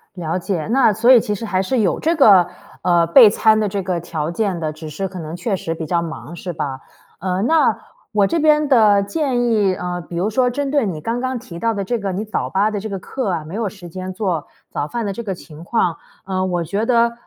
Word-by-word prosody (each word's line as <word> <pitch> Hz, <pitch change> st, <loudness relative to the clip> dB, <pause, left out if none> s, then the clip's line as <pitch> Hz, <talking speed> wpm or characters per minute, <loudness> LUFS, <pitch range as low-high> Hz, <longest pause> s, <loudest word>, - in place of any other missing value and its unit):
了 165 Hz, 0 st, -2 dB
解。 175 Hz, -3 st, -3 dB
那 250 Hz, -4 st, +5 dB
所 235 Hz, +5 st, +4 dB
以 245 Hz, -, +9 dB
其 210 Hz, -1 st, -2 dB
实 225 Hz, -, -6 dB
还 190 Hz, -2 st, 0 dB
是 245 Hz, +5 st, 0 dB
有 195 Hz, -5 st, +1 dB
这 330 Hz, +2 st, +1 dB
个， 200 Hz, -, +6 dB, 0.3 s
呃， 175 Hz, -1 st, +3 dB
备 205 Hz, +5 st, +8 dB
餐 220 Hz, 0 st, +3 dB
的 210 Hz, -, +1 dB
这 195 Hz, 0 st, -2 dB
个 180 Hz, -2 st, -1 dB
条 160 Hz, -1 st, -4 dB
件 190 Hz, -2 st, -1 dB
的， 155 Hz, -1 st, -2 dB
只 155 Hz, 0 st, -9 dB
是 190 Hz, +6 st, -3 dB
可 185 Hz, -1 st, -8 dB
能 160 Hz, +1 st, -6 dB
确 195 Hz, +3 st, -2 dB
实 165 Hz, -2 st, -4 dB
比 160 Hz, -1 st, -5 dB
较 170 Hz, +2 st, 0 dB
忙 165 Hz, 0 st, -7 dB
是 180 Hz, +1 st, -5 dB
吧。 135 Hz, -3 st, -4 dB, 0.4 s
呃， 185 Hz, +1 st, -1 dB
那 320 Hz, +5 st, +3 dB, 0.3 s
我 205 Hz, -2 st, +3 dB
这 335 Hz, -, 0 dB
边 300 Hz, -1 st, +4 dB
的 210 Hz, -6 st, +5 dB
建 255 Hz, +1 st, -1 dB
议， 210 Hz, -5 st, +2 dB
呃， 180 Hz, 0 st, -4 dB
比 170 Hz, -, -9 dB
如 195 Hz, +5 st, 0 dB
说 250 Hz, +3 st, +2 dB
针 280 Hz, +2 st, -2 dB
对 285 Hz, -6 st, +2 dB
你 165 Hz, -6 st, -3 dB
刚 230 Hz, +6 st, -2 dB
刚 255 Hz, 0 st, -2 dB
提 180 Hz, -8 st, -9 dB
到 230 Hz, -1 st, +1 dB
的 200 Hz, -1 st, -2 dB
这 235 Hz, +3 st, -2 dB
个 195 Hz, -2 st, -3 dB
你 195 Hz, +4 st, -3 dB
早 215 Hz, -, -3 dB
8 205 Hz, +3 st, +1 dB
的 205 Hz, -, -2 dB
这 220 Hz, +2 st, -6 dB
个 195 Hz, -, -3 dB
课 255 Hz, -1 st, -4 dB
啊， 165 Hz, -3 st, -2 dB
没 165 Hz, +6 st, -8 dB
有 225 Hz, -2 st, -1 dB
时 185 Hz, -4 st, -12 dB
间 185 Hz, +2 st, -6 dB
做 185 Hz, -6 st, -2 dB, 0.2 s
早 145 Hz, -, -2 dB
饭 235 Hz, +2 st, -3 dB
的 200 Hz, -, -2 dB
这 235 Hz, -, -6 dB
个 195 Hz, -3 st, -3 dB
情 160 Hz, -1 st, -12 dB
况。 180 Hz, -5 st, 0 dB, 0.3 s
呃， 185 Hz, -1 st, -1 dB
我 175 Hz, -2 st, -1 dB
觉 200 Hz, +7 st, -2 dB
得 235 Hz, -1 st, +3 dB
195 Hz, 270 characters per minute, -19 LUFS, 175-230 Hz, 0.4 s, 以